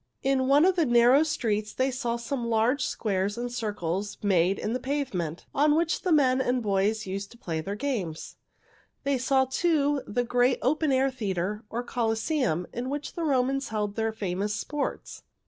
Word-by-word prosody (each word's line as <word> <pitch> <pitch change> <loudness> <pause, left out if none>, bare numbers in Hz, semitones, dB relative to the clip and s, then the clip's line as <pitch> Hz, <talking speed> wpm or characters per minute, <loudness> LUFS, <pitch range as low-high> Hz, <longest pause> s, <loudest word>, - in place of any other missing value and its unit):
In 265 -1 +2
one 285 +4 +5
of 375 -1 +3
the 335 -3 +2
narrow 240 +3 +6
streets 215 -9 -1
they 260 +1 +1
saw 245 -2 -2
some 235 0 -3
large 235 +4 +2
squares 200 -3 -1
and 245 0 -3
circles 205 -3 -3
made 190 -1 +3
in 215 - -2
the 250 - -1
pavement, 250 - -3
on 295 +1 +3
which 330 0 +1
the 365 - -1
men 265 -4 +4
and 250 -1 0
boys 210 +2 +1
used 195 +1 -4
to - - -17
play 165 -8 -3
their 195 +5 -4
games. 210 - -3 0.7
They 280 -2 +1
saw, 265 +1 +3
too, 290 0 +1
the 245 +4 0
great 245 +1 +2
open 300 +3 +2
air 265 +1 +2
theater, 210 -3 -3
or 240 +2 -3
Colosseum, 225 - 0
in 250 +2 -3
which 290 +1 -4
the 340 - -5
old 320 - 0
Romans 270 +1 +1
held 210 -2 -2
their 225 0 0
famous 205 -1 -2
sports. 290 +4 -4
240 Hz, 180 wpm, -27 LUFS, 205-275 Hz, 0.7 s, narrow